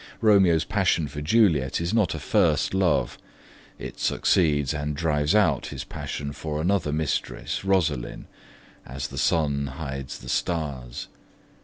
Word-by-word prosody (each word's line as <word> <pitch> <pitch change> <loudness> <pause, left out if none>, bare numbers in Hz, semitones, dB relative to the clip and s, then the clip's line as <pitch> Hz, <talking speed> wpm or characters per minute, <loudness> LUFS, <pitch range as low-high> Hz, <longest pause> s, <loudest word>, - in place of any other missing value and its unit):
Romeo's 95 -7 +4
passion 95 -7 +1
for 75 +1 -7
Juliet 80 - +3
is 85 +4 -2
not 105 -8 +2
a - - -4
first 75 - +2
love: 95 -2 +1 0.6
it - - -8
succeeds 75 -6 +2
and 75 0 -3
drives 75 +2 +1
out 95 -10 +3
his - - -6
passion 70 0 -5
for 75 +1 -4
another 85 -2 +1
mistress, 75 +4 -2
Rosaline, 85 -10 0 0.6
as 65 +2 -6
the - - -5
sun 70 -3 +1
hides 70 -2 -6
the 60 - -10
stars. 70 -6 -3
75 Hz, 135 wpm, -25 LUFS, 70-90 Hz, 0.6 s, Romeo's